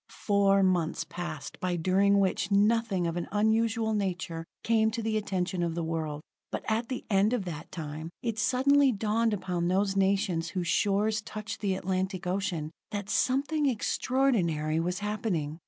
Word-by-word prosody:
Four 200 -1 +2
months 175 -3 +1
passed 170 -4 -6
by 180 -1 -1
during 195 +4 +3
which 190 0 +1
nothing 205 -2 +2
of 170 0 -2
an 175 - -3
unusual 220 +1 +2
nature 180 -5 -2 0.2
came 220 -1 +3
to 230 +1 -4
the 220 0 0
attention 190 -3 -1
of 170 -1 -1
the 170 - -2
world. 155 -2 -3 0.3
But - - -4
at 225 +1 0
the 255 - -4
end 205 +2 +3
of 225 -6 -1
that 160 -4 -7
time, 155 0 -6
it 230 -2 -2
suddenly 275 +3 +4
dawned 225 +1 +1
upon 180 -4 -1
those 195 +2 +1
nations 190 -4 +1
whose 180 -3 -3
shores 210 +4 +2
touched 215 0 -7
the 195 -3 +1
Atlantic 185 0 -2
ocean, 180 -4 -2 0.2
that 200 -1 -4
something 285 +3 +1
extraordinary 205 - +1
was 180 +2 -1
happening. 195 -8 -2
195 Hz, 160 wpm, -29 LUFS, 175-220 Hz, 0.3 s, suddenly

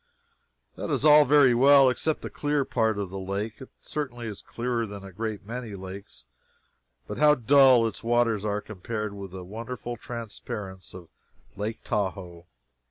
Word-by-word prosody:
That - - -4
is - - 0
all 150 -1 +8
very 140 -2 +5
well, 135 +2 +6
except 150 +5 0
the - - -6
"clear" 145 -2 0
part 110 -4 0
of 100 -3 -4
the 95 - -5
lake. 100 +4 -4
It 130 - -10
certainly 130 -6 -5
is 105 -3 -6
clearer 120 -1 -3
than 100 -1 -9
a 95 - -10
great 105 +1 -5
many 115 -1 -6
lakes, 95 +2 -10 0.8
but - - -6
how 150 0 +6
dull 130 -1 +5
its 115 - -4
waters 115 -3 +1
are 105 -1 -1
compared 105 +1 -5
with 100 -1 -8
the 90 0 -9
wonderful 120 +4 -6
transparence 105 -5 -7
of 90 -3 -11 0.5
Lake 105 +3 -4
Tahoe! 95 -5 -3
110 Hz, 165 wpm, -26 LUFS, 100-125 Hz, 0.8 s, all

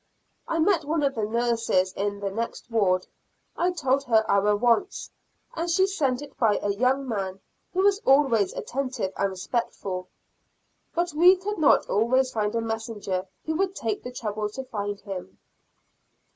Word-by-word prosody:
I 330 - -1
met 335 +1 +3
one 300 +1 0
of 275 -1 +2
the 220 -4 -1
nurses 230 -5 +1
in 205 0 -3
the 200 -1 -2
next 230 +2 -5
ward; 185 -5 +2 0.5
I 355 - +1
told 275 -5 +1
her 220 -3 +3
our 205 +1 +3
wants, 240 - +1 0.4
and 335 +1 -2
she 375 +3 +4
sent 290 -9 -1
it 280 -2 -12
by 215 -4 +3
a 205 - +1
young 260 +5 +1
man 195 -4 -3 0.3
who 375 +1 +1
was 400 0 +4
always 265 - +3
attentive 255 -7 -3
and 200 - 0
respectful, 190 -2 -3 0.9
but 345 -1 0
we 355 +5 +7
could 400 +1 -4
not 305 - +4
always 255 +5 +2
find 210 0 -1
a 230 - +1
messenger 220 -4 -3 0.2
who 315 - -1
would 385 0 0
take 220 - -2
the 250 - -7
trouble 215 -3 -3
to 265 +6 -6
find 205 -5 -4
him. 180 - -7
235 Hz, 165 wpm, -26 LUFS, 205-290 Hz, 0.9 s, we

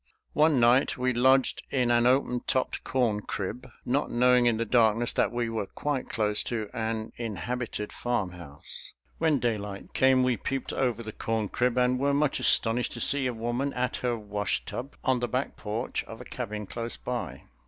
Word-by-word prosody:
One 150 -3 +4
night 120 +4 +4
we 125 0 +1
lodged 130 +2 +4
in 125 -3 +1
an 120 0 +4
open 125 -1 +2
topped 130 - 0
corn 115 -5 +1
crib, 115 +7 -5 0.2
not 135 +4 0
knowing 125 0 +4
in 115 -2 +3
the 115 - -1
darkness 115 0 +3
that - - +2
we 120 -1 -1
were 110 -3 -3
quite 145 +3 -3
close 105 -2 +1
to 110 -4 -3
an 110 -1 -3
inhabited 115 0 -4
farmhouse. 90 -11 -4 0.2
When 160 -3 +3
daylight 105 -5 -3
came 130 -1 +4
we 125 -2 +2
peeped 135 +5 -3
over 120 -3 0
the 110 - -6
corn 110 -1 -2
crib 125 0 0
and 125 0 +3
were 140 +1 +2
much 145 -1 +1
astonished 120 +2 +3
to - - -6
see 140 -2 +1
a - - 0
woman 120 +4 -2
at 125 0 -1
her 120 -2 -1
wash 105 -1 -2
tub 135 +4 -6
on 130 -1 +2
the 120 - -1
back 130 +4 -2
porch 110 +4 -3
of 115 - -10
a 125 - -9
cabin 105 -5 -5
close 115 +3 -5
by. 90 - -5
120 Hz, 185 wpm, -28 LUFS, 110-130 Hz, 0.2 s, One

